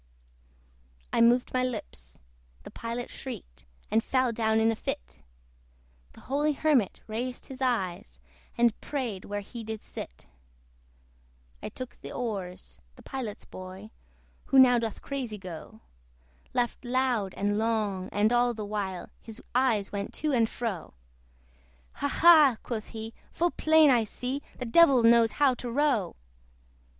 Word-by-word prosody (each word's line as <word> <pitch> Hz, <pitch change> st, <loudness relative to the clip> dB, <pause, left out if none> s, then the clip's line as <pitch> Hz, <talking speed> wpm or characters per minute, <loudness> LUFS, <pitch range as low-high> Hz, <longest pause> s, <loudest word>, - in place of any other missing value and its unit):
I -, -, +3 dB
moved 240 Hz, +2 st, +4 dB
my 255 Hz, 0 st, +2 dB
lips 135 Hz, -, -6 dB, 0.4 s
the -, -, -10 dB
Pilot 235 Hz, +1 st, -5 dB
shrieked -, -, -9 dB, 0.3 s
And 220 Hz, +1 st, +3 dB
fell 255 Hz, -2 st, +1 dB
down 220 Hz, -1 st, +1 dB
in 225 Hz, 0 st, +4 dB
a -, -, -2 dB
fit; 60 Hz, -, -5 dB, 0.9 s
The -, -, -15 dB
holy 295 Hz, +3 st, 0 dB
Hermit 280 Hz, -8 st, +1 dB
raised 245 Hz, +3 st, -4 dB
his 265 Hz, 0 st, -10 dB
eyes, 200 Hz, -8 st, -1 dB, 0.4 s
And 235 Hz, -2 st, +2 dB
prayed 240 Hz, -10 st, -4 dB
where 205 Hz, 0 st, -3 dB
he 230 Hz, +3 st, -8 dB
did 220 Hz, -1 st, -6 dB
sit. -, -, -9 dB, 1.4 s
I -, -, -5 dB
took 255 Hz, -1 st, -8 dB
the -, -, -8 dB
oars: 195 Hz, -7 st, -5 dB
the -, -, -16 dB
Pilot's 245 Hz, -6 st, -6 dB
boy, 185 Hz, +3 st, -10 dB, 0.5 s
Who 270 Hz, -, +2 dB
now 250 Hz, -2 st, +7 dB
doth 225 Hz, -2 st, -4 dB
crazy 255 Hz, -6 st, -4 dB
go, 170 Hz, -, -9 dB, 0.7 s
Laughed 245 Hz, +1 st, -1 dB
loud 245 Hz, -6 st, 0 dB
and 205 Hz, +1 st, 0 dB
long, 210 Hz, -4 st, -1 dB
and 210 Hz, +3 st, +2 dB
all 240 Hz, 0 st, +3 dB
the 215 Hz, -1 st, -5 dB
while 200 Hz, -3 st, -4 dB
His 225 Hz, +1 st, -9 dB
eyes 235 Hz, -6 st, +2 dB
went 200 Hz, 0 st, -4 dB
to 305 Hz, -1 st, -1 dB
and 230 Hz, -3 st, +3 dB
fro. 200 Hz, -, -4 dB, 1.0 s
"Ha! 285 Hz, -, 0 dB
ha!" 300 Hz, -5 st, +6 dB
quoth 220 Hz, -3 st, -4 dB
he, 225 Hz, 0 st, -7 dB, 0.2 s
"full 345 Hz, +1 st, 0 dB
plain 315 Hz, -2 st, +5 dB
I 235 Hz, -3 st, +3 dB
see, 255 Hz, +6 st, -4 dB, 0.2 s
The 250 Hz, -, -4 dB
Devil 270 Hz, -1 st, +6 dB
knows 230 Hz, -1 st, +5 dB
how 285 Hz, -3 st, +4 dB
to 245 Hz, 0 st, -6 dB
row." 255 Hz, -, +1 dB
230 Hz, 145 wpm, -28 LUFS, 205-255 Hz, 1.4 s, now